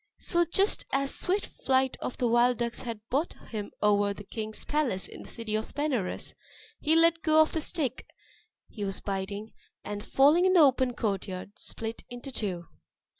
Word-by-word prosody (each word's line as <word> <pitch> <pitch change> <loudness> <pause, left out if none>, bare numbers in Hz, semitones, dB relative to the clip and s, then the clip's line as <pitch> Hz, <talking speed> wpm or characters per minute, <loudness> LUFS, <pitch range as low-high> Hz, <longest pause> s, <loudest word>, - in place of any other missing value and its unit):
So 345 -1 +2
just 390 +5 +2
as 275 0 +1
the - - -2
swift 385 +3 +1 0.2
flight 265 0 +2
of - - -4
the 245 - +1
wild 240 +1 +4
ducks 235 0 -2
had 225 -3 -7
brought 290 +7 0 0.2
him 210 -3 -4
over 205 -1 +3
the 205 - -9
king's 215 +1 -5
palace 280 -11 0
in - - -10
the - - -11
city 230 -2 -5
of 215 0 -2
Benares, 275 -10 -2 0.5
he 315 +1 +2
let 330 0 +5
go 310 0 +4
of 315 - +4
the 320 - 0
stick 290 -6 -2 0.6
he 210 - -7
was 195 -1 -1
biting, 200 +2 -4 0.3
and 205 0 -5
falling 300 +7 +5
in 375 - +4
the 365 - +6
open 260 -4 +4
courtyard, 195 -2 -3
split 225 0 -6
in 245 0 -7
two! 210 -10 -3
245 Hz, 180 wpm, -29 LUFS, 210-300 Hz, 0.6 s, the